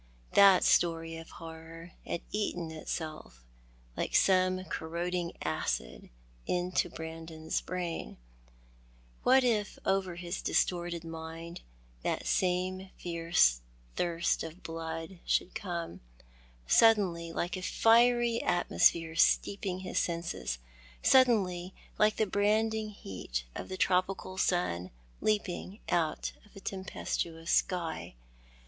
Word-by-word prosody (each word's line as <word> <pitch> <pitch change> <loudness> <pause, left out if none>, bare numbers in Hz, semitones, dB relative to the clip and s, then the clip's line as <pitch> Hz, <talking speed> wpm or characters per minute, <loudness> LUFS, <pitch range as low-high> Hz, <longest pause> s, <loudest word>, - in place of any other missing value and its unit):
That 195 -2 +7
story 165 -1 +2
of 165 0 -10
horror 165 +1 -10 0.2
had 170 - -2
eaten 175 -6 -2
itself, 155 - -6 0.5
like - - -2
some 185 -1 +4
corroding 170 +1 -3
acid, 80 -6 -2 0.4
into 180 0 0
Brandon's 160 0 -5
brain. 180 -2 -4 1.0
What 260 +1 +5
if 215 -5 +1
over 190 -2 +1
his 175 +1 -4
distorted 175 -1 0
mind 165 +1 -7 0.4
that - - -2
same 185 +1 0
fierce 165 - +2 0.3
thirst 170 -1 0
of 165 +3 -8
blood 165 +2 -5
should 180 - 0
come 170 -5 -5 0.3
— - - -27 0.2
suddenly, 180 - +4
like 175 +1 -2
a 185 - -5
fiery 235 +3 +4
atmosphere 170 -2 +2
steeping 185 +1 +2
his 185 - -1
senses 170 - -2 0.2
— - - -23
suddenly, 190 -8 +4 0.2
like 215 0 +4
the 220 - +2
brand 210 +2 +2
ing 220 -1 -3
heat 90 - -5
of - - -7
the 185 - -4
tropical 185 0 0
sun 90 - 0 0.3
leaping 205 -1 -1
out 160 -3 0
of 210 - -22
a - - -9
tempestuous 170 -3 -3
sky 170 - 0
175 Hz, 115 wpm, -31 LUFS, 165-190 Hz, 1.0 s, That